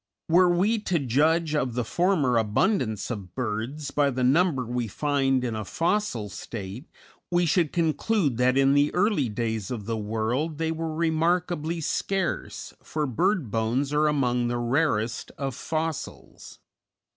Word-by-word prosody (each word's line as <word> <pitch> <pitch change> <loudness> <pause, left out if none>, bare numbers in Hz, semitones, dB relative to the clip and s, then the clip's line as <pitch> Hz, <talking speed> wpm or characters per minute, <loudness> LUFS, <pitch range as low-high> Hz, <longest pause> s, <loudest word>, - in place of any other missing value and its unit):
Were 180 +2 +5
we 200 +6 +2
to 185 -4 0
judge 155 +4 +2
of 130 -6 0
the 125 -2 -1
former 155 - +2
abundance 110 - 0
of 100 -6 -7
birds 125 +5 -3
by 145 -1 +2
the 130 -1 -2
number 140 0 +3
we 120 0 -2
find 135 +2 +1
in 120 -3 -2
a 110 - -3
fossil 165 - -1
state, 100 - -7 0.4
we 175 0 +2
should 165 -1 +2
conclude 165 - +1
that 125 +1 +3
in 135 0 +4
the 145 +1 +3
early 180 - +2
days 110 -2 -3
of 115 -5 -5
the 115 +1 -2
world 115 +9 -2
they 160 0 -1
were 160 -1 -3
remarkably 165 0 0
scarce, 190 +3 -2
for 155 -1 -2
bird 165 - 0
bones 120 +6 0
are 150 +1 +3
among 125 -5 +1
the 120 0 -1
rarest 120 -2 0
of 135 -2 -3
fossils. 160 +3 -5
140 Hz, 150 wpm, -26 LUFS, 120-165 Hz, 0.4 s, Were